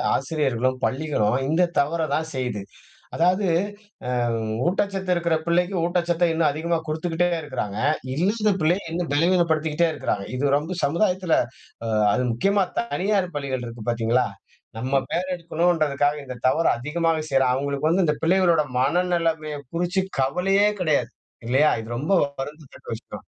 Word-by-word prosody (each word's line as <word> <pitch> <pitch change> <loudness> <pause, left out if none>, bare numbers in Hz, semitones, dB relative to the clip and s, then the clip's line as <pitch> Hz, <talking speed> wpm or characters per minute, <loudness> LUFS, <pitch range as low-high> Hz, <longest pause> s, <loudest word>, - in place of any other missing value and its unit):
ஆசிரியர்களும், 135 -4 0
பள்ளிகளும் 130 -6 0
இந்த 175 +3 +3
தவற 155 +4 +1
தான் 160 +1 -2
செய்து. 125 -5 -2 0.5
அதாவது 180 +4 +2 0.8
அ - - +1 0.5
ஊட்டச்சத்து 195 0 -1
இருக்கிற 170 -1 +1
பிள்ளைக்கு 175 +3 +1
ஊட்டச்சத்த 175 0 +1
இன்னும் 160 -2 +2
அதிகமா 165 +2 -1
குடுத்துக்கிட்டே 165 +3 0
இருக்கறாங்க. 125 -8 -4 0.4
இல்லாத 210 +7 +1
பிள்ளையை 175 +6 +2
இன்னும் 170 -3 -2
பலவீனப்படுத்திகிட்டே 165 0 +2
இருக்கிறாங்க 100 -9 -2
இது 140 +1 +2
ரொம்ப 160 +5 -3
சமுதாயத்தில, 180 +3 +1 0.8
அது 125 +5 +1
முக்கியமா 195 - +2 0.2
தனியார் 200 -5 -1
பள்ளிகள் 135 -3 -3
இருக்கு 115 -1 -8
பார்த்தீங்களா, 120 +2 +1 0.5
நம்ம 130 +4 0
பேர் 185 +2 -1
எடுக்கணுன்றதுக்காக 155 -4 +1
இந்த 130 -1 -7
தவறு 165 +5 +2
அதிகமாக 160 +4 0
செய்றாங்க. 135 -2 +3
அவங்களுக்கு 140 +2 -1
வந்து 185 +2 +3
இந்த 150 -1 +1
பிள்ளைகளோட 170 -2 +3 0.2
மனநிலைமையை 165 -1 0
குறிச்சு 180 +3 0 0.2
கவலையே 190 +9 +2
கிடையாது. 155 -4 +1 0.4
இல்லையா? 135 +5 +4
இது 110 - -10
ரொம்ப 150 +9 -1 0.3
வருந்தத்தக்க 145 +1 -9
விஷயம். - - -11
160 Hz, 130 wpm, -24 LUFS, 140-175 Hz, 0.8 s, இல்லையா